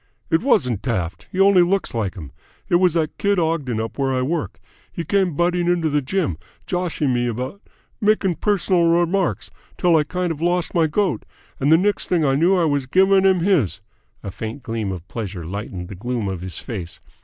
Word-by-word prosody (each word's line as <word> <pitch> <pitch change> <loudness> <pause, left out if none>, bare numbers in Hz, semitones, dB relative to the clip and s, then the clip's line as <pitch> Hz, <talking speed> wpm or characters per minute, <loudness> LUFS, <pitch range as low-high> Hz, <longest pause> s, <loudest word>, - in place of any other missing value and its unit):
"It 160 - +3
wasn't 125 - +2
Taft. 95 -9 -3
He 185 - -4
only 195 -1 +6
looks 190 +3 +1
like 110 -5 -2
him. 80 -7 -9 0.4
It 175 - +5
was 180 -2 +2
that 160 -2 -1
kid 200 0 +2
Ogden 160 -9 0
up 110 +4 -5
where 135 -1 +1
I 130 -1 0
work. 130 - -3 0.3
He 170 - -5
came 190 -5 +1
butting 175 +1 +1
into 170 -3 +1
the 145 0 +2
gym, 140 - -1 0.3
joshing 175 -7 -1
me 120 0 0
about 130 - -4 0.4
makin' 210 -3 +2
pers'nal 185 -4 +2
remarks 175 +2 0 0.3
till 175 -2 +3
I 155 - +4
kind 180 +3 -2
of 160 -1 -6
lost 175 0 0
my 165 -2 +3
goat, 190 +3 0 0.4
and 140 +3 +2
the 160 - +8
next 205 +4 0
thing 170 -4 +2
I 135 - +3
knew 170 +7 +3
I 175 - +2
was 145 -4 0
giving 190 +5 +4
him 190 -2 +4
his!" 170 - +1 0.4
A 100 - -5
faint 115 +7 -6
gleam 110 -4 -3
of 90 -1 -7
pleasure 100 -7 -5
lightened 95 -1 -6
the 100 - -8
gloom 115 +2 -3
of 95 -3 -4
his 90 -3 -5
face. 90 -7 -6
155 Hz, 200 wpm, -21 LUFS, 115-180 Hz, 0.4 s, the